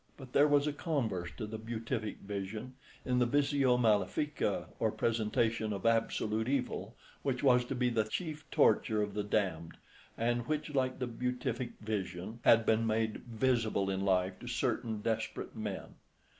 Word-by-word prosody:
But 130 -3 -11
there 145 +1 +6
was 145 -1 +4
a 150 - 0
converse 120 - -1
to - - -3
the 110 +1 -6
Beatific 115 0 -4
Vision 105 +5 -5 0.3
in 125 -1 +2
the 125 - +3
Visio 140 -1 +3
malefica, 115 +6 +1
or - - +2
presentation 115 -1 0
of 100 0 -4
absolute 110 0 +1
Evil, 125 -6 -2 0.3
which 130 -2 -1
was 125 -2 +5
to 135 +2 -3
be 125 0 +1
the 110 -2 +2
chief 155 +6 -5
torture 110 -2 +3
of 105 -1 -4
the 105 0 -1
damned, 90 -6 -1 0.4
and 120 +1 0
which, 150 -1 -2
like 130 -2 +1
the 130 - -2
Beatific 125 0 -3
Vision, 105 0 -4
had 115 -1 +6
been 110 +1 +3
made 110 0 0
visible 115 -4 +1
in 95 0 -1
life 95 -1 +1
to - - -9
certain 110 -3 -1
desperate 110 +2 -2
men. 105 -4 -5
115 Hz, 160 wpm, -33 LUFS, 105-125 Hz, 0.4 s, there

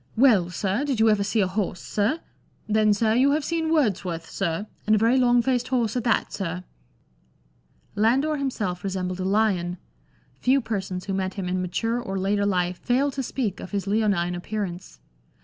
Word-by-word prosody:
" - - -29
Well, 190 -8 +3
sir, 195 +7 -1
did 275 -6 -1
you 220 0 +5
ever 205 -1 +2
see 210 +2 +1
a 190 - +2
horse, 185 -2 -2
sir? 220 +11 -1 0.5
Then, 215 0 +3
sir, 220 +2 +2
you 265 +4 +4
have 300 -1 0
seen 325 -1 -1
Words 235 - +2
worth, 165 -3 -5
sir, 180 0 -2
— - - -35
and 215 - +5
a - - +3
very 230 +5 +3
long 245 -1 +4
faced 250 -1 0
horse 240 -4 0
at 245 - -1
that, 230 - +1
sir! 180 -2 -4 0.7
" - - -38
Landor 265 +9 +2
himself 210 -10 -2
resembled 185 -1 -3
a - - -2
lion; 190 -3 +1 0.6
few 265 +2 +3
persons 195 -6 -4
who 195 - -3
met 190 -1 -2
him 195 -3 -3
in 185 0 -1
mature 225 +7 -1
or 195 -5 -4
later 200 +2 +1
life 180 -2 0
fail 265 +3 +1
to 270 - -3
speak 235 -6 -3
of - - -7
his 200 -2 -2
leonme 200 -4 +1
appearance. 180 -1 -5
205 Hz, 200 wpm, -25 LUFS, 185-245 Hz, 0.7 s, you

